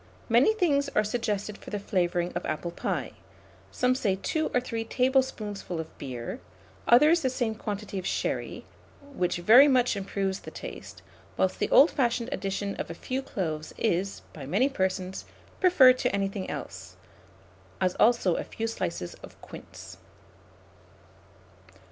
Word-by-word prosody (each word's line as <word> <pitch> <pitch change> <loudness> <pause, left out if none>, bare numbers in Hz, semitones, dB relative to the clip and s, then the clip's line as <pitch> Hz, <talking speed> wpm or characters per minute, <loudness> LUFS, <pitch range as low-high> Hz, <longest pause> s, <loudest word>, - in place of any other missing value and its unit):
Many 245 - +4
things 285 -8 +2
are 215 - +4
suggested 210 -2 -2
for - - -11
the 210 - -3
flavouring 175 -3 -1
of - - -3
apple 170 +2 -3
pie; - - -3 0.6
some 250 0 +1
say 210 -7 0
2 310 +11 -1
or 250 - +2
3 230 -2 -4
tablespoonfuls 230 -8 0
of 160 - -7
beer, 125 -4 -6 0.5
others 305 +7 +6
the 260 - +1
same 240 -3 -1
quantity 205 -2 -5
of 180 - -5
sherry, - - -3 0.5
which 180 -4 0
very 230 +11 +7
much 250 -4 +3
improve 195 -1 -2
the - - -9
taste; - - -9 0.3
whilst - - +1
the - - 0
old 290 +5 +7
fashioned 240 -3 0
addition 200 -4 -3
of - - -4
a 170 - -6
few 260 +9 -3
cloves 160 -11 -4
is, 195 -2 -1
by 140 -4 -8
many 205 - +2
persons, 190 -5 -2 0.3
preferred 265 -9 +6
to - - 0
anything 195 -1 -2
else, 95 -10 -7 0.8
as 185 -1 +1
also 220 -7 +4
a - - -2
few 225 - -5
slices 175 - -3
of - - -13
quince. - - -11
205 Hz, 150 wpm, -27 LUFS, 185-255 Hz, 0.8 s, very